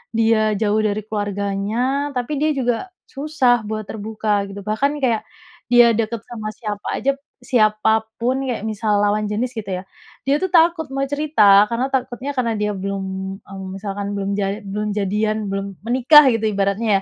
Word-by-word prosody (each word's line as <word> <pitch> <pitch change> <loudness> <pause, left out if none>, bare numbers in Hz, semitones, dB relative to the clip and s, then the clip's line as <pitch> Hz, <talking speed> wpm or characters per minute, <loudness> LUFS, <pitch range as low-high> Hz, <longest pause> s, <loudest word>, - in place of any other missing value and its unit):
dia 220 -1 +3
jauh 210 +1 +1
dari 215 -1 0
keluarganya, 210 +7 -1
tapi 250 +4 -2
dia 310 +1 +2
juga 245 -3 +1 0.3
susah 270 -5 +1
buat 215 0 -3
terbuka, 210 -1 -1
gitu. 200 +1 -8
Bahkan, 215 +7 0
nih, - - -13
kayak 230 -3 +1 0.5
dia 240 -1 +8
dekat 230 -1 -2
sama 220 -3 -6
siapa 210 -1 -6
aja, 275 +5 +1 0.3
siapa 220 -2 +2 0.2
pun, 250 +3 +1
kayak 245 -5 -2
misal 210 -1 0
lawan 205 +1 +1
jenis, 215 +4 -2
gitu 200 -3 -4
ya, - - -16 0.4
dia, 275 - +4
tuh, 375 +3 -2
takut 335 -1 +4
mau 275 0 0
cerita, 245 -9 +5
karena 245 +3 -1
takutnya 260 +1 -2
karena 235 -3 +1
dia 210 -1 -1
belum, 195 +1 -3 0.4
mmm, 195 -1 -9
misalkan 200 0 -4
belum 200 -1 -2
jal 195 -1 0
belum 210 +2 -3
jadian, 210 +1 -1
belum 195 0 -2 0.2
menikah, 260 +5 +7
gitu, 225 -2 0
ibaratnya, 200 +1 +1
215 Hz, 165 wpm, -20 LUFS, 205-250 Hz, 0.5 s, dia